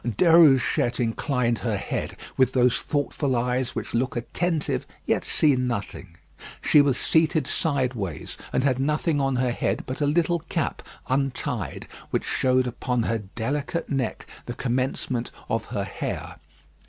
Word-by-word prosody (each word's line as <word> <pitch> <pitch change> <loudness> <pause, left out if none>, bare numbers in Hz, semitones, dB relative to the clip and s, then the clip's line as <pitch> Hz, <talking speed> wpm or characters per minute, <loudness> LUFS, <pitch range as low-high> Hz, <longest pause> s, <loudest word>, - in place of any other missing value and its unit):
Déruchette 135 - +4
inclined 120 0 0
her 115 -4 -1
head, - - -4 0.2
with 130 -1 +3
those 125 -1 +3
thoughtful 145 -2 -1
eyes 125 +1 0
which - - -4
look 125 +3 0
attentive 160 +7 -1 0.2
yet - - +1
see 150 -3 +3
nothing. 115 -8 -3 0.4
She 150 - +5
was 140 -3 +2
seated 160 -1 +2
sideways, 125 - -1 0.2
and 130 - +1
had 130 -2 +2
nothing 150 +2 +1
on 135 -1 +1
her 125 0 +1
head - - -1
but 130 +3 -5
a 145 - +3
little 170 +3 +2
cap 165 -4 -1 0.3
untied, 135 0 -2 0.2
which - - 0
showed 130 0 +2
upon 125 0 -1
her 115 0 0
delicate 135 - -3
neck 130 -4 -2 0.2
the 120 - -4
commencement 125 -1 -1 0.2
of - - 0
her - - -3
hair. - - -5
130 Hz, 140 wpm, -25 LUFS, 120-145 Hz, 0.4 s, She